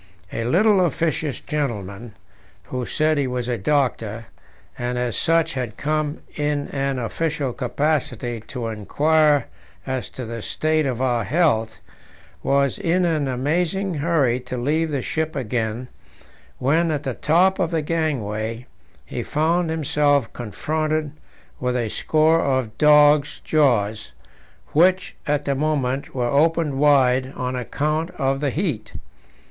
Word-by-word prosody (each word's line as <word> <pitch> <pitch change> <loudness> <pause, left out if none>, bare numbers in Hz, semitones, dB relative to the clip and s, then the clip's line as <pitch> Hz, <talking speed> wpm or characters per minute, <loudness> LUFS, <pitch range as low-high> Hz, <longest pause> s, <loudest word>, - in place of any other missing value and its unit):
A 115 - -2
little 190 - +4
officious 155 -3 -1
gentleman, 115 -6 -4 0.5
who 125 -1 -4
said 155 -1 +1
he 140 - +1
was 125 -1 -3
a 120 -2 -1
doctor, 115 -3 0 0.5
and 125 0 -3
as 125 -2 -1
such 165 0 +2
had 125 -4 -4
come 155 0 -1
in 145 -1 -1
an 135 -1 -1
official 140 +2 -2
capacity 125 -3 -1
to 125 -4 -5
inquire 145 +7 +2 0.4
as 130 -1 -3
to 130 - -7
the 115 0 -6
state 155 +5 0
of 130 -1 -2
our 120 -3 +1
health, 115 - +1 0.6
was 140 -1 +1
in 175 +2 +1
an 155 -4 +1
amazing 170 +9 0
hurry 145 -6 +1
to 125 0 -6
leave 155 +6 0
the 140 -4 -2
ship 160 0 -2
again 120 -1 -2 0.7
when, 160 +6 +2
at 150 -2 -1
the - - -2
top 185 +5 +2
of 175 -3 +1
the 165 -2 -1
gangway, 120 -8 -2 0.4
he - - -4
found 165 +3 +1
himself 145 -4 +1
confronted 155 +7 -2 0.5
with 125 0 -1
a 115 -3 -1
score 160 +7 +2
of 130 -5 0
dogs' 150 -1 +5
jaws, 110 -8 +1 0.6
which 185 +4 +3
at 145 0 0
the 140 - +1
moment 140 -2 -1
were 125 -2 0
opened 150 +2 +2
wide 130 -3 +4
on 125 0 -3
account 150 +6 -1
of 135 0 0
the 145 -1 0
heat. 150 - -3
140 Hz, 135 wpm, -22 LUFS, 125-155 Hz, 0.7 s, dogs